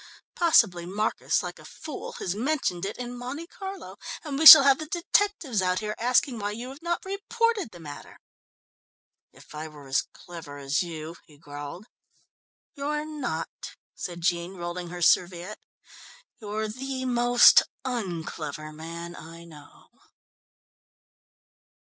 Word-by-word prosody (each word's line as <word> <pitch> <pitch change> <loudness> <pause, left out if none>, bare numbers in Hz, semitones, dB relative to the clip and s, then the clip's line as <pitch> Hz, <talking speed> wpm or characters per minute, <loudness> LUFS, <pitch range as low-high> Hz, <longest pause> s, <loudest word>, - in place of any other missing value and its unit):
Possibly 210 - +3
Marcus, 210 +4 -1
like - - -7
a - - -14
fool, 310 -3 -8
has 180 - -3
mentioned 215 - -1
it 205 - -6
in 245 0 -6
Monte 255 +7 -6
Carlo, 385 +2 -9 0.3
and 290 -3 -4
we 320 - +8
shall 310 -3 +14
have 275 0 +4
the 310 - -6
detectives 340 - 0
out 180 0 +1
here 210 +1 -3
asking 245 +1 +2
why 205 0 -2
you 240 +4 -7
have 275 +3 -11
not 345 +1 -2
reported 415 - -1
the 175 - -14
matter." 150 -3 -11 1.1
"If - - -17
I 155 +1 -6
were 150 -3 -13
as 135 - 0
clever 165 -5 -11
as 140 +1 -1
you 165 -1 -6
" - - -35
he 150 -3 -19
growled. 145 +5 -9 0.9
"You're 300 +1 -3
not," 260 - -5 0.2
said 175 -1 -7
Jean, 175 +2 -1
rolling 175 0 -5
her 175 0 -5
serviette. 180 +4 +2 0.8
"You're 215 0 -3
the 260 +4 -5
most 245 -1 +6 0.2
un 200 -10 -3
clever 155 -1 -7
man 170 +2 -8
I 165 0 -11
know." 150 -3 -16
205 Hz, 140 wpm, -26 LUFS, 170-275 Hz, 1.1 s, shall